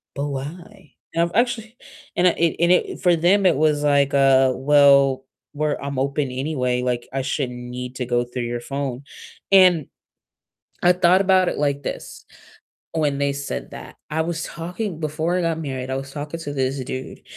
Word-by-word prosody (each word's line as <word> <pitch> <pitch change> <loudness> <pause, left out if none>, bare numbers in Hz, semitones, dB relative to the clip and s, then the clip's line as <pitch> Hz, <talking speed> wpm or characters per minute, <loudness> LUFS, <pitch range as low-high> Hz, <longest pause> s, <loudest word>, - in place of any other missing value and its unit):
"But 140 +1 -2
why?" 160 +6 -8 0.2
And 170 - +2
I've 170 - -2
actually 235 -1 0 0.4
and 180 +1 +4
I - - +5
and - - -9
it 165 -2 +2
and 170 +1 +3
it 180 - +1
for 175 -1 +4
them, 190 +4 +3
it 175 - +5
was 150 0 +2
like, 140 -1 +3
uh, 135 -1 +5
"Well, 140 -1 +4 0.3
we're 150 0 -1
I'm 140 -1 -5
open 140 0 -1
anyway, 125 -2 -1
like, 125 -1 -2
I 135 - -1
shouldn't 130 -2 -2
need 125 +1 -7
to 125 - -3
go 120 0 +1
through 125 0 -5
your 120 0 -3
phone," 135 -1 -4 0.5
and 180 -6 +6 1.0
I 175 0 +6
thought 180 +1 +4
about 185 -2 +3
it - - -3
like 140 -1 0
this - - -7 0.7
when 150 -3 0
they 140 0 +1
said 140 0 -5
that. - - -10
I 160 +1 -1
was 165 -1 -3
talking 175 +1 -5
Before 160 +3 -1
I - - +1
got 165 -1 -1
married, 130 -3 -5
I 130 - -1
was 135 0 -6
talking 150 +2 -6
to 145 -3 -5
this 135 0 -1
dude, 130 +1 -7
145 Hz, 190 wpm, -22 LUFS, 135-170 Hz, 1.0 s, and